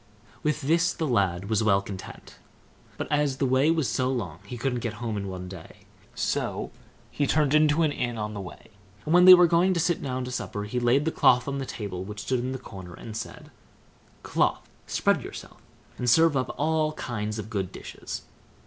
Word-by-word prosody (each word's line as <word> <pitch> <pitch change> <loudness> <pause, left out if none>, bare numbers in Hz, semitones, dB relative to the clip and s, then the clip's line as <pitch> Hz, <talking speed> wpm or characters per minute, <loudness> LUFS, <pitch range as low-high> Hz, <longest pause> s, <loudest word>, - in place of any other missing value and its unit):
With 150 0 0
this 165 +4 +2
the 160 - -2
lad 100 -6 +1
was 110 0 +1
well 100 -2 +4
content. 100 -1 -9 0.6
But, - - -3
as 145 -2 +1
the 140 - +1
way 130 +3 +3
was 160 -5 +2
so 130 0 0
long 95 - -4
he 120 - -6
couldn't 125 0 -1
get 115 -1 -3
home 110 0 -4
in 100 -1 -3
one 90 -1 -6
day, 90 -3 -11 0.3
so - - -2 0.4
he 145 - 0
turned 150 -1 +2
into 155 +1 +4
an 155 - +2
inn 120 -4 -2
on 105 0 -3
the 100 - -5
way; 90 +3 -11 0.3
and 155 - 0
when 180 0 +7
they 185 0 +12
were 180 0 +6
going 175 +3 +3
to - - +1
sit 175 0 +1
down 130 -1 -3
to 125 - -6
supper 105 -4 -4
he 105 +4 -2
laid 125 +5 +3
the 160 - +1
cloth 125 -3 +4
on 140 0 -2
a - - -3
table 95 -4 -5
which 105 +1 -7
stood 130 +2 0
in 125 +2 -3
the 130 - -3
corner, 95 -7 -10
and 110 -2 -9
said, 110 - -7 0.7
"Cloth, - - 0 0.2
spread - - +1
yourself, - - -10 0.4
and 125 - +1
serve 160 +4 +5
up 130 -1 -1
all 155 0 +1
kinds 105 -5 -4
of 110 +1 -6
good 95 -3 -2
dishes." - - -7
125 Hz, 210 wpm, -26 LUFS, 105-150 Hz, 0.7 s, they